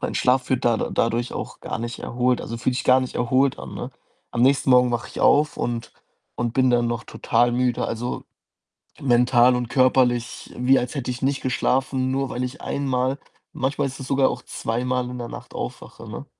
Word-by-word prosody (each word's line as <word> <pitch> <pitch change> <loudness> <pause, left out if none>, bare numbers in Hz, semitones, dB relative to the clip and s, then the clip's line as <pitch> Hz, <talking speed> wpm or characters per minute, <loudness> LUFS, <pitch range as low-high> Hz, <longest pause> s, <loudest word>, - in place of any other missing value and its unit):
mein - - -3
Schlaf 130 +1 +2
wird 130 -2 +1
da 120 -1 +4
dadurch 120 +1 -1
auch - - -6
gar - - -4
nicht 120 +1 -5
erholt. 125 +1 0
Also, 115 - -5
fühlt 125 +2 -1
sich - - -3
gar 130 +1 +5
nicht 130 - -4
erholt 130 +2 +2
an, - - -8
ne? - - -5 0.4
Am 120 - 0
nächsten 135 +1 +3
Morgen 125 -1 +6
wache 120 - -2
ich - - -7
auf 150 +1 +4
und 115 -1 -3 0.4
und 120 -2 -2
bin 130 0 +3
dann 120 -1 +3
noch 120 0 -3
total 120 +1 +1
müde. 125 0 0
Also, 115 +2 -4 0.8
mental 125 -1 +4
und 125 -1 -3
körperlich, 125 -2 +1
wie 130 +2 +4
als 125 +4 -4
hätte 130 -2 -2
ich 125 - -6
nicht 135 +1 0
geschlafen. 130 +1 0
Nur 135 0 -1
weil 125 - -3
ich 125 +4 -8
einmal 130 -1 -1 0.3
manchmal 135 +1 -1
ist 135 0 -8
es 130 - -7
sogar 135 0 +3
auch - - -5
zweimal 125 +2 -2
in 125 - -6
der 120 - -5
Nacht - - -10
aufwache, - - -7
ne? - - -7
125 Hz, 200 wpm, -23 LUFS, 120-130 Hz, 0.8 s, Morgen